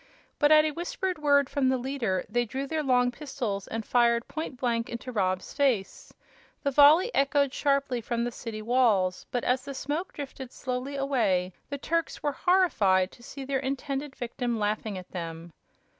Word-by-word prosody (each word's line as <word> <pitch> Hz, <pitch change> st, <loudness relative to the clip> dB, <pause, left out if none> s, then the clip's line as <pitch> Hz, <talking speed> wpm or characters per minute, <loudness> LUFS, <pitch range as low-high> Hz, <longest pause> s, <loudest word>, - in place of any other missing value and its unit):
But 295 Hz, 0 st, +4 dB
at 305 Hz, 0 st, +7 dB
a 310 Hz, -, 0 dB
whispered 350 Hz, +2 st, -3 dB
word 285 Hz, -2 st, +4 dB
from 270 Hz, -2 st, +1 dB
the 260 Hz, -, +2 dB
leader, 245 Hz, -7 st, -2 dB
they 240 Hz, +2 st, +1 dB
drew 265 Hz, +4 st, -4 dB
their 315 Hz, +2 st, -2 dB
long 250 Hz, -3 st, +3 dB
pistols 245 Hz, -8 st, -4 dB
and 225 Hz, -1 st, -4 dB
fired 235 Hz, -1 st, +3 dB
point 310 Hz, -4 st, -5 dB
blank 235 Hz, -2 st, 0 dB
into 235 Hz, +2 st, -6 dB
Rob's 185 Hz, -4 st, -1 dB
face. 255 Hz, -9 st, 0 dB, 0.5 s
The 280 Hz, -, +1 dB
volley 305 Hz, -, +6 dB
echoed 280 Hz, 0 st, +2 dB
sharply 275 Hz, -4 st, +1 dB
from 235 Hz, +1 st, -2 dB
the 240 Hz, -, -2 dB
city 220 Hz, -2 st, -7 dB
walls, 215 Hz, -6 st, +2 dB
but 245 Hz, -, -2 dB
as 250 Hz, +1 st, +1 dB
the 275 Hz, -, -7 dB
smoke 295 Hz, +7 st, -3 dB
drifted 270 Hz, -3 st, -7 dB
slowly 255 Hz, +2 st, -4 dB
away 215 Hz, -10 st, +1 dB, 0.2 s
the 280 Hz, -, -3 dB
Turks 330 Hz, +3 st, -2 dB
were 295 Hz, -, +1 dB
horrified 220 Hz, -, +3 dB
to -, -, -17 dB
see 270 Hz, +3 st, -8 dB
their 270 Hz, 0 st, 0 dB
intended 275 Hz, +1 st, -3 dB
victim 240 Hz, -1 st, -3 dB
laughing 210 Hz, -1 st, -2 dB
at 185 Hz, -, -10 dB
them. 165 Hz, -1 st, -6 dB
260 Hz, 175 wpm, -28 LUFS, 230-280 Hz, 0.5 s, at